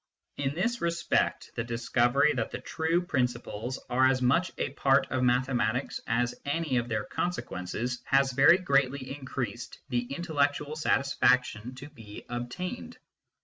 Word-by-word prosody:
In 140 0 -1
this 235 +7 -1
respect, 170 0 0
the 115 - -2
discovery 120 +4 +2
that - - -2
the - - -5
true 165 +2 0
principles 125 - -2
are 130 +1 +4
as 130 -1 +2
much 135 +9 +2
a - - -2
part 135 -1 +3
of 130 - 0
mathe 125 +1 +3
matics 125 0 0
as 120 +1 +1
any 145 -2 -1
of 120 0 -1
their 110 -2 -1
consequences 120 - -3
has 135 0 +3
very 170 +7 +6
greatly 140 -5 0
increased 130 -3 -5
the 120 -2 0
intellectual 145 -1 -1
satisfaction 125 -5 +1
to 135 +3 -9
be 115 -8 -12
obtained. 120 - -5
130 Hz, 145 wpm, -29 LUFS, 120-145 Hz, -, very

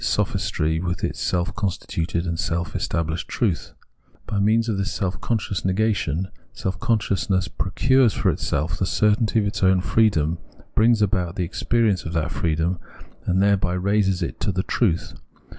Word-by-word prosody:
sophistry 80 +1 0
with, 90 +1 -3
its - - -2
self 90 0 0
constituted 85 -4 -2
and 85 -2 -2
self 85 -2 -1
estabHsbed 80 0 -2
truth. - - -1 0.5
By 105 - -2
means 110 +3 +3
of 105 -4 -1
this 100 - -1
self 95 -1 -2
conscious 105 -6 -1
negation, 95 -3 0 0.3
self 95 -2 -3
consciousness 95 -6 +1
procures 125 +7 +2
for - - +1
itself 80 +4 -2
the 95 - +1
certainty 105 +2 +2
of 105 - +3
its 100 - -2
own 95 -1 +4
freedom, 90 -6 +2 0.3
brings 110 -1 +4
about 90 -4 0
the 90 -4 -1
experi 115 +4 +1
ence 90 -3 -2
of 85 - -5
that 80 0 -1
freedom, 80 +2 0 0.5
and 95 +2 +3
thereby 100 -3 +2
raises 95 0 +1
it - - -1
into 100 - -3
the 95 +1 -1
truth. 95 -9 0
95 Hz, 160 wpm, -23 LUFS, 85-105 Hz, 0.5 s, own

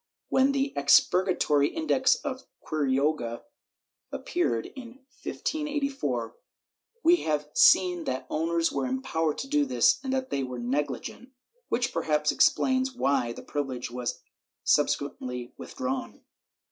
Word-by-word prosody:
^ - - -59 0.3
When 265 +1 +3
the 275 0 -1
expur 180 +6 +4
gatory 150 -5 +2
Index 270 -5 +2
of 260 -2 -5 0.2
Quiroga 140 -4 0 0.7
appeared, 230 - -1
in 260 +1 -11 0.2
1584, 275 - -2 0.7
we 345 +1 +6
have 150 - -1
seen 180 -3 +5
that 130 0 -3
owners 165 +1 0
were - - -1
empowered 165 - -1
to 270 - -5
do 295 +1 +2
this 250 -2 +3
and 265 - -3
that 260 -1 -2
they 140 - 0
were 125 -1 -5
negligent, 145 - -3 0.4
which 245 0 0
perhaps 150 -1 +1
explains 260 0 +2
why 135 - +1
the - - -9
privilege 130 -5 -4
was 125 0 -4 0.4
subsequently 125 -4 0
with - - -10
drawn. 265 -1 -4
170 Hz, 130 wpm, -27 LUFS, -, 0.7 s, we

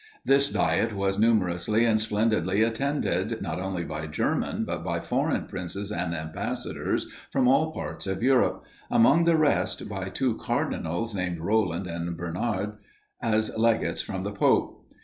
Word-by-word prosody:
This 140 +1 +4
Diet 115 -1 +1
was 95 0 0
numerously 105 -1 +2
and 110 -2 +3
splendidly 105 -2 +1
attended, 115 -4 0
not 85 +1 -3
only 95 -2 -2
by 75 -1 -5
German 75 - -1
but - - -4
by - - -1
foreign - - 0
princes 100 +3 -5
and 85 -3 -2
ambassadors 80 0 -3 0.3
from 130 -2 +2
all 150 +5 +4
parts 80 - -5
of 95 +3 -2
Europe; 130 0 +3 0.3
among 140 +9 +5
the 170 -1 +4
rest, 155 -2 +1
by 95 -2 -4
two 125 +4 0
cardinals, 90 +8 -2
namely, 90 -3 -2
Roland 95 -2 +1
and 85 -1 -4
Bernard, 105 +5 -2 0.4
as 110 -2 +1
legates 115 0 +2
from - - -5
the - - -3
pope. - - +1
105 Hz, 150 wpm, -27 LUFS, 90-115 Hz, 0.4 s, among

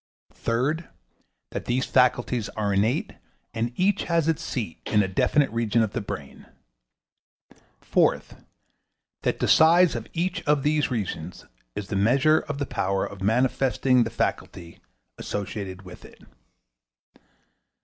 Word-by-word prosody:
Third 140 +9 -1 0.6
That - - -5
these 125 +2 0
faculties 125 -3 +2
are 105 -1 -2
innate, 105 +5 0 0.4
and 115 +1 -2
each 195 +6 +1
has 165 -2 +1
its 165 -2 0
seat 105 - -4
in 105 -1 +3
a - - -1
definite 135 +9 +2
region 115 0 +1
of 105 - -3
the - - -2
brain. 75 -8 -8 1.3
Fourth - - 0 0.8
That - - 0
the - - -1
size 170 +2 +6
of 115 -2 -5
each 175 +2 -1
of 145 -2 +2
these 150 0 +1
regions 90 - -4 0.3
is 100 - -5
the - - -2
measure 135 +10 +4
of 145 - -6
the 140 - -2
power 95 -5 -1
of 100 -1 -9
manifesting 125 +3 +2
the 115 - -3
faculty 85 -5 -4 0.4
associated 100 -2 -5
with 90 - -12
it. - - -15
120 Hz, 135 wpm, -25 LUFS, 100-145 Hz, 1.3 s, size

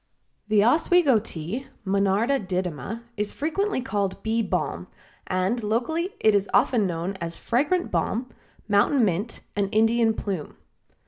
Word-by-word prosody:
The 210 -1 +4
Oswego 305 -1 +4
Tea 205 - -6 0.2
(Monarda 200 +6 +1
didyma) 180 - -3
is 210 0 -1
frequently 330 +3 -1
called 200 -6 -2
Bee 225 +1 +1
Balm, - - -2 0.4
and 185 +6 0
locally 245 - -1
it 215 - +4
is 200 0 +1
often 220 -6 +3
known 175 +3 -3
as 170 0 -5
Fragrant 295 +9 0
Balm, 245 +3 -1 0.4
Mountain 215 +5 +3
Mint 200 +5 -2
and 200 -1 0
Indian 225 +1 +3
Plume. 190 -9 -4
215 Hz, 130 wpm, -25 LUFS, 195-245 Hz, 0.4 s, The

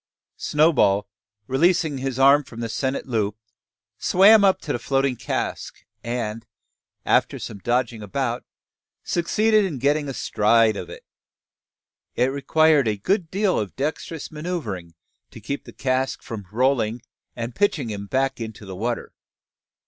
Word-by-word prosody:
Snowball, 145 -11 +3 0.4
releasing 160 - +2
his 130 -1 -3
arm 140 +2 +6
from 115 -3 -11
the 115 -1 -3
sennit 130 +4 -2
loop, 110 -4 -1 0.6
swam 205 +3 +6
up 195 -1 +4
to - - -3
the 120 - -2
floating 135 +1 0
cask; 120 0 -4 0.2
and, 115 -2 -3 0.6
after - - +2
some 100 - -7
dodging 120 0 -1
about, 120 +4 -2 0.6
succeeded 215 +5 +2
in 175 -8 -2
getting 145 +3 +1
astride 110 -2 +2
of 90 -3 -6
it. - - -11 1.1
It 125 +2 +2
required 150 0 +3
a 105 -1 0
good 170 - 0
deal 195 +1 +1
of 105 -3 -4
dexterous 155 +2 -4
manoeuvring 130 - -5 0.3
to - - -12
keep 140 +7 -5
the - - -10
cask 130 0 -1
from 105 -5 -7
rolling, 120 -1 +1 0.3
and 115 0 -5
pitching 155 - 0
him 100 -1 -6
back 135 +2 0
into 110 -2 -7
the 95 -1 -7
water. 115 +5 -3
130 Hz, 140 wpm, -23 LUFS, 110-150 Hz, 1.1 s, arm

